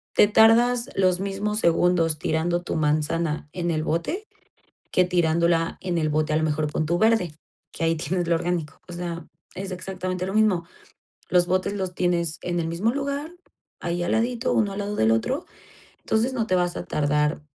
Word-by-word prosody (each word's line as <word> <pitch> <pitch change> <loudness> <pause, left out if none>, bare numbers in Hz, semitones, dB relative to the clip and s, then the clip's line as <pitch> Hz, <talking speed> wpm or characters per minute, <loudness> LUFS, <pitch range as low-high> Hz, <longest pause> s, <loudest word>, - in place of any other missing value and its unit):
te 205 - +6
tardas 235 +3 +5
los 185 -2 +3
mismos 200 +2 -2
segundos 170 -2 +2
tirando 170 +3 0
tu - - -3
manzana 155 0 0
en 175 -1 -2
el 155 -1 -1
bote 170 - -2 0.7
que 185 - +3
tirándola 170 -1 +1
en 175 -2 -1
el 155 -1 +1
bote 155 0 0
a 155 - +2
lo 160 - +1
mejor 155 -1 0
pon 155 - -1
tu 170 +2 +1
verde, 220 -8 +2 0.4
que 165 - -4
ahí 165 0 +2
tienes 175 +4 -2
lo 170 - +3
orgánico, 170 -3 -2
o - - -8
sea, 170 -2 -5 0.3
es 190 0 -5
exactamente 185 0 -4
lo 190 - -3
mismo, 205 -6 +2 0.6
los 175 -1 +4
botes 185 +2 0
los 190 -3 -3
tienes 170 -2 0
en 175 -1 -1
el 165 - -1
mismo 170 +7 0
lugar, 280 +3 -3 0.5
ahí 175 0 -2
al 175 - -1
ladito, 240 +2 0
uno 205 -3 +2
al 200 - -5
lado 205 +1 -3
del 110 - +3
otro, 115 0 0 0.6
entonces 225 +4 0
no 225 -3 -1
te 185 - +2
vas 175 -1 0
a - - -4
tardar 150 +1 0
175 Hz, 190 wpm, -24 LUFS, 165-200 Hz, 0.7 s, te